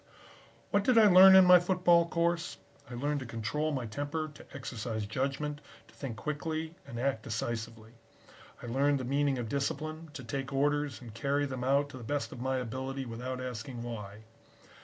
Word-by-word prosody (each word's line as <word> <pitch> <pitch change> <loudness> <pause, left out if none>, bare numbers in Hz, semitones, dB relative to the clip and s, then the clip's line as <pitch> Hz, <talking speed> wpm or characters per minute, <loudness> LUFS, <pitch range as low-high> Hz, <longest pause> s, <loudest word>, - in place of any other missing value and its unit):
"What 200 0 +3
did 245 +2 +3
I 220 - +8
learn 190 -1 +9
in 190 -1 +9
my 180 0 +9
football 175 -1 +3
course? 170 -3 -1 0.3
I 125 - -7
learned 145 +4 -1
to 130 - -7
control 115 +8 -2
my 130 -4 -2
temper, 145 +7 -4
to - - -13
exercise 110 -3 -4
judgment, 140 +6 -2 0.3
to - - -20
think 125 -6 -6
quickly 155 +1 -3
and 120 - -6
act 130 -3 0
decisively. 115 0 -4 0.7
I - - -5
learned 140 +4 +1
the 130 - -4
meaning 140 +1 +1
of 120 -2 -3
discipline, 155 +5 -3
to 145 -5 -7
take 135 +3 -4
orders 145 0 0
and 115 -3 -10
carry 140 +5 0
them 130 -3 -4
out 140 +2 +2
to 130 - -9
the - - -9
best 145 +5 -2
of 120 - -8
my 130 0 0
ability 130 +2 -4
without 125 +2 -5
asking 125 0 -6
why. 105 -3 -7
135 Hz, 180 wpm, -31 LUFS, 120-150 Hz, 0.7 s, learn